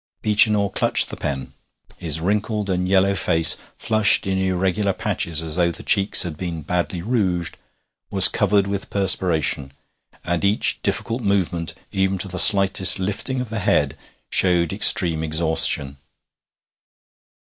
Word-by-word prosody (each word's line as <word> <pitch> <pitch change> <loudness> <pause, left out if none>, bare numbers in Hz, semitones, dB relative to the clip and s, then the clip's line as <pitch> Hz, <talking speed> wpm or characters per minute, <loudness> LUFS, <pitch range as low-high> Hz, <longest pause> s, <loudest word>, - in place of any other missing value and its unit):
Beechinor 105 -1 +2
clutched - - +1
the - - -7
pen. 70 -2 -7 0.5
His 80 -2 0
wrinkled 105 +3 -3
and 90 0 -3
yellow 95 +1 +1
face, 80 -4 +4 0.2
flushed 110 -2 +1
in 95 0 -3
irregular 95 +1 -2
patches 80 -3 -3
as 80 +1 -5
though 85 -1 0
the 85 - -10
cheeks 100 -1 +3
had 80 -4 -8
been 85 -3 -7
badly 90 +1 -5
rouged, 95 -7 -3 0.5
was 95 -1 +8
covered 100 -1 -1
with 100 0 -6
perspiration, 85 -8 0 0.5
and 90 0 -4
each 100 +2 0
difficult 115 +3 -4
movement, 95 -5 -3 0.2
even 95 0 -2
to 95 - -3
the 90 0 -5
slightest 95 -2 +5
lifting 105 +7 -4
of 125 - -8
the 115 -1 -5
head, 95 - -1 0.4
showed 85 -3 +1
extreme 80 -3 +4
exhaustion. 80 -3 0
95 Hz, 140 wpm, -19 LUFS, 85-100 Hz, 0.5 s, was